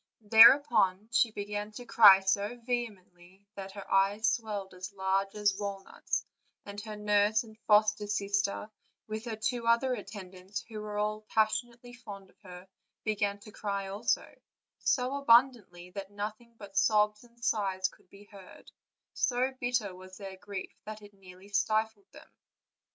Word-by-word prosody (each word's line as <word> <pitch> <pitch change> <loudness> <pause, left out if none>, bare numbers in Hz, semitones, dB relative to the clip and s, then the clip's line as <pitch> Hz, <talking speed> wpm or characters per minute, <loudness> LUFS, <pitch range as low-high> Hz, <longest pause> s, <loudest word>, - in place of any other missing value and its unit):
Thereupon 220 -2 +6
she 230 0 +3
began 205 0 -5
to 245 +3 -9
cry 205 -5 +8
so 200 +4 -1
vehemently 195 -6 -6
that 195 -1 -8
her 200 -1 -7
eyes 200 +3 +2
swelled 210 -5 -5
as 185 +2 -8
large 195 +1 -1
as 205 -2 +1
walnuts, 200 -1 -4 0.4
and 205 0 -7
her 215 0 -7
nurse 210 +1 +2
and 220 -2 -15
foster 210 0 +3
sister, 200 +1 -1 0.3
with 215 +2 -6
her 230 -2 -4
two 230 +2 -2
other 235 +3 +3
attendants, 190 -3 -7
who 215 -2 -7
were 210 -1 -6
all 210 +1 -1
passionately 240 +2 -1
fond 200 -6 -11
of - - -36
her, 180 -2 -12 0.4
began 205 -2 -1
to 215 - -13
cry 200 -2 -4
also, 205 +4 -1 0.5
so 255 +1 0
abundantly 230 -9 +3
that 195 0 -7
nothing 215 +3 -7
but 200 -2 -12
sobs 210 +1 +2
and 235 0 -12
sighs 190 -4 0
could 185 - -20
be 200 +1 -15
heard; 200 -3 -15 0.4
so 255 +1 0
bitter 245 -6 -1
was 185 +1 -13
their 195 -2 -8
grief 190 0 -7
that 215 0 -9
it 205 0 -14
nearly 190 0 -15
stifled 215 +1 -1
them. - - -15
205 Hz, 150 wpm, -30 LUFS, 195-220 Hz, 0.5 s, cry